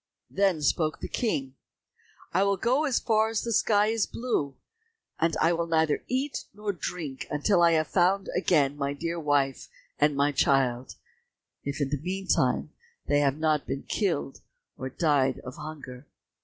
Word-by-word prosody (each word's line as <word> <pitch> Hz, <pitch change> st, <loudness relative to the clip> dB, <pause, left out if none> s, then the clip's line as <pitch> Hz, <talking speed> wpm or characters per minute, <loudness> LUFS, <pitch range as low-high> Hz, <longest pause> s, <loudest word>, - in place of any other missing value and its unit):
Then 190 Hz, -6 st, +1 dB
spoke 155 Hz, +1 st, +1 dB
the -, -, -5 dB
King, 135 Hz, -, -2 dB, 0.8 s
"I 185 Hz, -, +3 dB
will 200 Hz, 0 st, +1 dB
go 255 Hz, +9 st, +1 dB
as 275 Hz, -5 st, +1 dB
far 220 Hz, -1 st, +2 dB
as 225 Hz, -1 st, -2 dB
the 235 Hz, -, -3 dB
sky 210 Hz, -1 st, +3 dB
is 225 Hz, -1 st, 0 dB
blue, 190 Hz, -, -2 dB, 0.6 s
and 165 Hz, -1 st, +1 dB
will 170 Hz, 0 st, +2 dB
neither 160 Hz, -2 st, +1 dB
eat 265 Hz, +3 st, -2 dB
nor 210 Hz, -1 st, -3 dB
drink 160 Hz, -6 st, -5 dB
until 175 Hz, +5 st, +2 dB
I 170 Hz, -1 st, +5 dB
have 155 Hz, -1 st, +2 dB
found 190 Hz, +2 st, +2 dB
again 150 Hz, -6 st, +2 dB
my 140 Hz, 0 st, -1 dB
dear 165 Hz, +3 st, -3 dB
wife 145 Hz, -3 st, 0 dB, 0.3 s
and 150 Hz, 0 st, +3 dB
my 140 Hz, +1 st, +2 dB
child, 130 Hz, -3 st, +1 dB, 0.7 s
if 140 Hz, +1 st, -4 dB
in 140 Hz, -2 st, 0 dB
the 145 Hz, -2 st, -2 dB
meantime 190 Hz, +3 st, 0 dB, 0.3 s
they 145 Hz, -, +2 dB
have 140 Hz, -1 st, +1 dB
not 155 Hz, -2 st, +1 dB
been 135 Hz, -, -3 dB
killed, 165 Hz, -9 st, -2 dB, 0.3 s
or 130 Hz, -, -5 dB
died 135 Hz, -3 st, +1 dB
of 130 Hz, -, -8 dB
hunger." 145 Hz, -4 st, -9 dB
155 Hz, 160 wpm, -27 LUFS, 140-195 Hz, 0.8 s, I